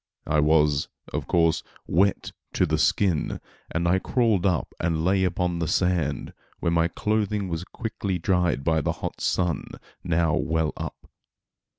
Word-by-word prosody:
I 75 0 +2
was, 75 -1 +3 0.3
of - - -3
course, 80 -2 +3 0.2
wet 95 +3 +1 0.2
to - - +3
the - - 0
skin, 90 -7 +1 0.3
and 85 +1 -1
I 95 +2 +3
crawled 110 -5 +2
up 90 -4 -1
and 80 -1 0
lay 95 +1 +3
upon 90 -1 0
the 85 - -1
sand 85 -6 0 0.3
where 85 - 0
my 85 0 +3
clothing 105 +1 -1
was 85 0 -3
quickly 100 -4 -3
dried 90 -4 +1
by 80 +1 +2
the - - 0
hot - - -6
sun, 85 -5 0 0.4
now 85 -2 +1
well 80 -1 0
up. - - -7
85 Hz, 155 wpm, -25 LUFS, 80-95 Hz, 0.4 s, was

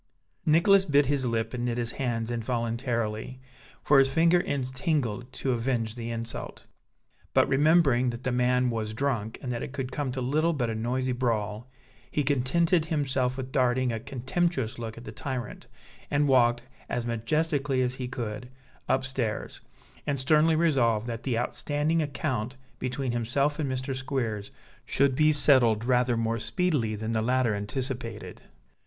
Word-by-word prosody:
Nicholas 185 +5 +5
bit 145 -4 +3
his 135 -2 0
lip 115 0 -1
and 120 -1 -3
knit 120 -1 -1
his 120 -1 0
hands 120 -3 -2
involuntarily, 115 0 -2 0.4
for 140 -1 +5
his 135 0 +4
finger 170 +4 +4
ends 130 -5 -2
tingled 130 -4 -1
to 135 - -2
avenge 115 -2 -1
the 115 -1 -6
insult; 115 0 -6 0.7
but - - +5
remembering 140 -3 +4
that 120 +1 -6
the 130 - 0
man 125 0 +2
was 110 -1 -3
drunk, 115 -5 -2
and 125 - -3
that 120 - -3
it 130 - -6
could 135 -2 -4
come 140 -2 -2
to 130 - -4
little 155 +7 +1
but 120 -6 -1
a - - -2
noisy 125 +4 -1
brawl, 115 -2 -2 0.4
he 150 - 0
contented 155 +5 +2
himself 135 -5 0
with 130 -1 -5
darting 130 -1 +2
a 115 - -3
contemptuous 130 0 -2
look 115 -1 -6
at 115 - -9
the 110 - -8
tyrant 125 +2 -5 0.4
and 145 0 +2
walked, 120 -3 +3 0.3
as 120 -1 -2
majestically 135 +3 0
as 125 0 -1
he 130 -1 -5
could, 120 -1 -5 0.4
upstairs, 130 -4 -2 0.5
and 140 -2 0
sternly 155 +4 +4
resolved 125 -9 +2
that 115 -1 -4
the 125 -4 -1
outstanding 145 +6 0
account 135 -4 -3 0.2
between 130 0 -2
himself 140 +6 0
and 140 -4 -1
Mr. 130 +1 -3
Squeers 120 -6 -3 0.3
should 140 -1 +2
be 155 +2 +4
settled 120 -7 +5
rather 125 -1 +2
more 115 0 0
speedily 145 - 0
than 110 +2 -3
the 110 - +1
latter 125 0 +2
anticipated. 115 +1 -4
125 Hz, 160 wpm, -27 LUFS, 115-140 Hz, 0.7 s, Nicholas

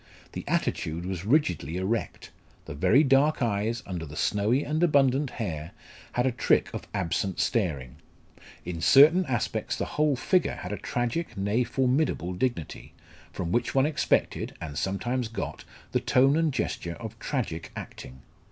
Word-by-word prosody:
The - - -6
attitude 80 +2 -1
was 95 -1 -4
rigidly 90 - +1
erect; 105 +5 -3 0.3
the - - -7
very 115 - +4
dark 140 +2 +3
eyes, 115 +1 -1
under 90 -4 -5
the 75 -1 -8
snowy 105 - +1
and 155 +2 -1
abundant 140 -4 +3
hair, 85 -10 -5 0.4
had 125 - +1
a 130 - +2
trick 115 -2 +1
of - - -6
absent 90 +3 -1
staring; 75 - -1 0.7
in 85 -2 -5
certain 155 - +6
aspects 120 -4 -1
the - - -2
whole 150 -2 +1
figure 180 +7 +1
had - - -7
a 105 - -3
tragic, 120 - -3
nay, 100 +5 +1
formidable 125 - 0
dignity, 90 - -3 0.4
from 85 -2 -4
which 120 - 0
one 135 0 +4
expected, 150 -1 0
and 80 -3 -6
sometimes 115 - -1
got, 115 - -6 0.3
the - - +2
tone 135 +3 +3
and 160 -1 +2
gesture 85 -9 -3
of 115 0 -8
tragic 95 - -3
acting. 65 +1 -9
115 Hz, 150 wpm, -27 LUFS, 90-135 Hz, 0.7 s, certain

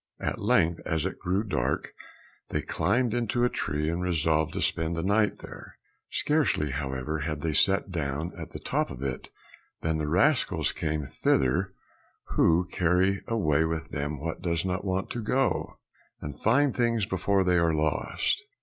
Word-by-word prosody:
At - - -3
length 85 +1 +2
as 80 -1 -1
it 95 - -4
grew 95 +3 0
dark 90 - -1 0.6
they - - -1
climbed 110 +8 +1
into 120 0 0
a 125 - +4
tree 75 -6 -2
and 85 +2 -1
resolved 80 -3 +1
to - - -2
spend 80 +1 0
the 80 - -2
night 105 +2 +2
there. - - -10 0.3
Scarcely, 145 - +1
however, 70 +2 -3
had 75 -1 -3
they 80 0 -1
sat 100 +4 +2
down 80 0 -2
at - - -7
the - - -7
top - - -1
of 65 - -7
it 65 -2 -4 0.5
than 80 -1 0
the 75 - -1
rascals 90 - +2
came 75 -2 -2
thither 85 +9 +1 0.5
who 85 +2 +3
carry 90 +3 +2
away 80 -10 +2
with 80 0 -2
them 75 0 -3
what 80 +3 -4
does 85 -1 -1
not 90 0 -1
want 95 -1 -2
to 120 - -3
go, 130 +5 0 0.4
and 75 0 -7
find 135 +5 +3
things 115 -4 +1
before 95 +1 +1
they 90 -1 +3
are 85 -1 +2
lost. 80 - 0
85 Hz, 165 wpm, -28 LUFS, 75-100 Hz, 0.6 s, a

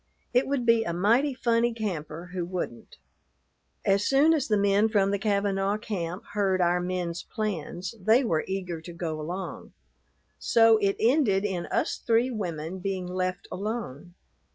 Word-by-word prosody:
It 250 +2 +3
would 270 -3 -1
be 230 -1 +4
a 170 - -3
mighty 235 +10 +2
funny 235 -1 +1
camper 175 -5 -5
who 180 -2 -2
wouldn't. 170 -9 -5 0.9
As 195 +1 +3
soon 285 +6 +4
as 300 -5 0
the 210 - +2
men 200 +2 +3
from 200 -2 +2
the 200 - 0
Kavanaugh 200 -1 0
camp 185 -4 -4
heard 195 -2 +1
our 175 0 +3
men's 175 -1 -3
plans, 185 -3 -4
they 225 +7 +4
were 165 -10 0
eager 180 -4 -4
to 170 +1 -9
go 160 -2 -4
along. 180 +5 -6 0.7
So 225 -1 +5
it 200 -2 +1
ended 225 -6 +3
in 185 -4 -2
us - - -1
three 235 +2 +1
women 175 -5 -4
being 190 -1 -3
left 185 0 -3
alone. 185 - -5
195 Hz, 155 wpm, -27 LUFS, 175-225 Hz, 0.9 s, So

